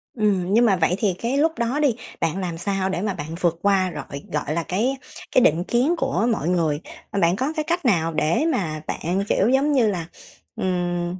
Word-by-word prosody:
Ừm, 200 -4 +1
nhưng 235 +2 +5
mà 200 - +4
vậy 175 +1 +2
thì 205 -3 +1
cái 245 +4 -1
lúc 320 +2 +3
đó 235 +5 0
đi, 275 -7 +2 0.3
bạn 165 +2 0
làm 175 -3 -3
sao 190 +1 -1
để 190 - -2
mà 205 -2 -1
bạn 160 -1 -6
vượt 170 -1 +1
qua 195 -2 +2
rọi 140 0 -7
gọi 150 0 -1
là, 170 - -1
cái 235 +11 -1 0.3
cái 255 - +5
định 165 -4 +3
kiến 255 - +1
của 265 -6 0
mọi 210 - -1
người, 160 -4 +1 0.3
ờ, 200 - -1
bạn 170 0 +3
có 265 +9 -1
cái 310 - -1
cách 345 -2 -1
nào 165 -8 +2
để 155 - +1
mà 155 - -2
bạn, 185 +4 -1
kiểu, 205 - +3
giống 275 +3 +3
như 250 -6 +3
là, 175 -5 -2 0.5
ừm, 175 -1 -2
190 Hz, 220 wpm, -23 LUFS, 170-235 Hz, 0.5 s, nhưng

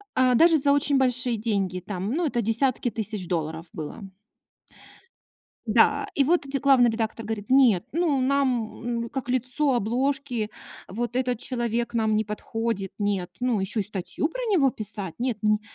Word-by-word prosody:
а, 255 -1 +4
даже 330 +4 +6
за 280 0 +3
очень 285 0 +3
большие 250 -2 +2
деньги 200 -4 -1
там. 190 +2 -4
Ну, 335 +6 0
это 245 -5 0
десятки 235 +3 +1
тысяч 215 -4 -3
долларов 160 -1 -3
было. 155 +6 -7 1.7
Да, - - +3
и 280 - +4
вот 335 +6 +2
де 275 0 -2
главный 265 -4 +5
редактор 225 0 -3
говорит: 210 -2 -5
"Нет, 250 -9 +5
ну, 320 -4 +1
нам, 275 +1 +2 0.6
мм, 235 - -6
как 260 -1 -5
лицо 255 +3 +2
обложки, 245 0 -1 0.4
вот 240 +3 -4
этот 250 -2 0
человек 235 -2 -2
нам 220 -2 +1
не 215 +1 +1
подходит, 210 -1 -3
нет. 200 -4 -1
Ну, 245 -3 0
ещё 195 +3 -1
и - - -2
статью 205 - -3
про - - -6
него 280 -9 +4
писать? 205 -5 -4
Нет." 245 -3 -1
Ни 210 0 +3
235 Hz, 165 wpm, -25 LUFS, 210-265 Hz, 1.7 s, даже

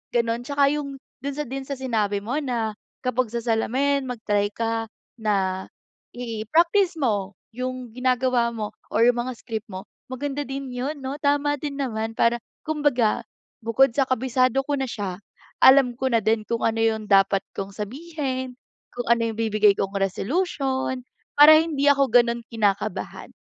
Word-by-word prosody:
gano'n. 235 0 +1
Tsaka 285 -1 +3
'yung 280 -2 -4 0.3
do'n 280 0 -3
sa 300 - -2
din 270 +2 -4
sa 280 - -4
sinabi 220 -6 0
mo 255 +7 -1
na 235 -6 -2 0.3
kapag 255 -1 0
sa 235 - -1
salamin 265 +5 +1
mag-try 210 -5 -1
ka 225 0 -1 0.3
na 195 -4 0 0.5
i-practice 320 - +1
mo 205 -6 0 0.2
'yung 255 0 -4
ginagawa 255 -1 +2
mo 215 -2 -5 0.2
or 230 - +4
'yung 245 - +1
mga 255 - -4
script 220 -1 -5
mo 190 +1 -7 0.2
maganda 285 +2 -3
din 275 0 -5
'yun, 275 +5 -3
'no. 265 +1 -4
Tama 290 0 +2
din 285 -2 -4
naman 225 -4 -2
para 235 +1 +3 0.3
kumbaga 290 -8 +1 0.4
bukod 230 +5 +4
sa 270 +2 +2
kabisado 255 +1 +2
ko 290 - -2
na 270 - -1
siya, 195 -5 -4 0.4
alam 265 -2 +7
ko 265 0 0
na - - +6
din 220 +1 +1
kung 230 0 -1
ano 225 0 +1
'yung 220 -1 +1
dapat 195 0 +4 0.2
kong 195 0 -4
sabihin, 260 - -4 0.4
kung 245 0 -5
ano 235 0 +4
'yung 220 - -10
bibigay 215 -2 +4
kong 195 0 -2
resolution, 260 - -1 0.4
para 305 +1 +10
hindi 305 -3 +1
ako 280 -1 +4
gano'n 235 -1 +3
kinakabahan. 205 -3 -1
245 Hz, 160 wpm, -24 LUFS, 220-275 Hz, 0.5 s, para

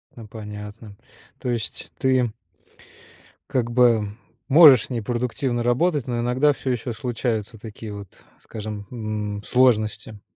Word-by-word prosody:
Ну, 115 -3 -10
понятно. 105 0 -9 0.4
То 125 - -4
есть 115 -2 -4
ты 130 -3 +2 1.2
как 120 -3 0
бы, 120 -3 +4 0.4
можешь 140 -5 +8
с - - -15
ней 120 -3 -2
продуктивно 120 +2 -2
работать, 135 +4 +1
но 120 -1 -2
иногда 130 +5 +2
всё 135 - -5
еще 120 -1 -2
случаются 115 -1 -3
такие 110 0 -9
вот, 100 -1 -8 0.3
скажем, 105 -2 -7
м, 105 -3 -4
сложности? 110 -4 +1
120 Hz, 125 wpm, -23 LUFS, 105-125 Hz, 1.2 s, можешь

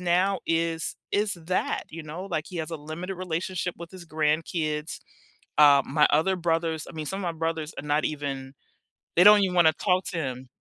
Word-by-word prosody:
now 180 +1 +2
is 165 0 0 0.2
is 205 -1 +1
that, 175 +2 -2
you 165 +1 -7
know, 160 +5 -7
like 160 -5 -2
he 180 - -8
has 160 +1 -4
a 165 - -3
limited 160 +6 -6
relationship 180 0 -3
with 170 -1 -9
his 185 -2 -10
grandkids. 155 0 -1 0.6
Uh, 145 -2 +7
my 150 -1 +4
other 175 +6 +3
brothers, 165 -2 -1
I - - -12
mean, 155 -1 -5
some 195 +5 -3
of - - -5
my 170 -2 -3
brothers 160 -1 -2
are 150 - -6
not 150 +1 +1
even, 140 -2 -4 0.6
they 175 - +6
don't 210 0 +9
even 185 -2 0
want 175 -2 +6
to 160 - +5
talk 185 -1 +1
to 170 - -4
him. 130 -4 -4
165 Hz, 205 wpm, -26 LUFS, 155-180 Hz, 0.6 s, don't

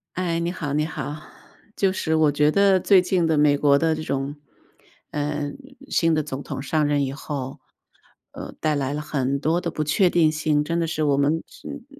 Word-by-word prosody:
哎， 170 -2 -1
你 170 +1 -1
好 150 -5 -4
你 150 +1 +1
好。 150 -1 -5 0.6
就 190 -1 +2
是 160 -4 -1
我 155 -2 +4
觉 150 +1 +3
得， 195 +1 +4
最 195 -1 +5
近 180 -2 +1
的 160 -1 +2
美 145 -1 +4
国 140 -1 +4
的 160 -1 +1
这 155 - -5
种 140 0 -3 0.8
嗯， 145 0 -3 0.3
新 165 -1 +2
的 155 - +2
总 140 -2 -6
统 - - -5
上 150 +2 0
任 145 -1 +1
以 135 - -4
后 140 -2 -6 0.7
呃， - - -8
带 155 -1 +1
来 140 -1 -1
了 150 - -3
很 140 -2 -1
多 160 +4 +1
的 170 -2 -3
不 155 0 -2
确 180 +5 +3
定 165 -3 +3
性， 155 -1 0
真 170 +2 -1
的 - - +1
是 155 -1 -2
我 145 -2 +3
们 145 +4 +1
是 - - -18
嗯， 285 -4 -8
155 Hz, 225 characters per minute, -23 LUFS, 145-165 Hz, 0.8 s, 最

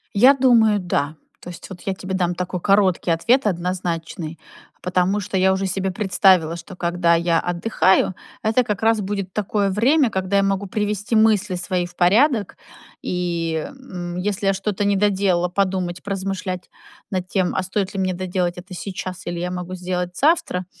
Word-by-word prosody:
Я 255 +7 +7
думаю, 230 -5 +4
да. 160 -4 -1 0.3
То - - -9
есть 175 - -10
вот 185 -3 -10
я 195 - -2
тебе 190 0 -6
дам 180 -2 0
такой 180 0 -4
короткий 195 -4 +2
ответ 230 +9 +2
однозначный. 170 -3 -3 0.4
Потому 180 +2 +1
что 190 0 -3
я 190 +1 +4
уже 190 +1 -1
себе 190 0 -1
представила, 185 -4 +3
что 170 +3 -10
когда 170 -1 +2
я 170 0 +2
отдыхаю, 185 +1 +1 0.3
это 225 +3 +3
как 210 -3 -3
раз 225 -1 +3
будет 195 -2 -4
такое 205 -1 0
время, 250 +7 +3
когда 190 0 0
я 195 - +3
могу 195 0 0
привести 210 +1 -2
мысли 210 -3 +3
свои 180 0 -1
в 175 - -13
порядок 215 - +3 0.4
и, 170 -3 -2
м, 180 -11 -7
если 195 +1 -1
я 195 - +4
что-то 195 +1 -2
не 200 -1 +2
доделала, 190 -3 +2
подумать, 185 -2 -1
поразмышлять 190 -2 -4 0.4
над 185 -1 -2
тем, 185 -3 0
а 185 - 0
стоит 190 +1 -2
ли 195 - -3
мне 185 -1 0
доделать 180 -1 -2
это 185 +1 -10
сейчас 185 0 -6
или 175 0 -4
я 180 +1 -3
могу 180 0 -5
сделать 180 0 -3
завтра. 285 - +2
185 Hz, 175 wpm, -21 LUFS, 180-205 Hz, 0.4 s, Я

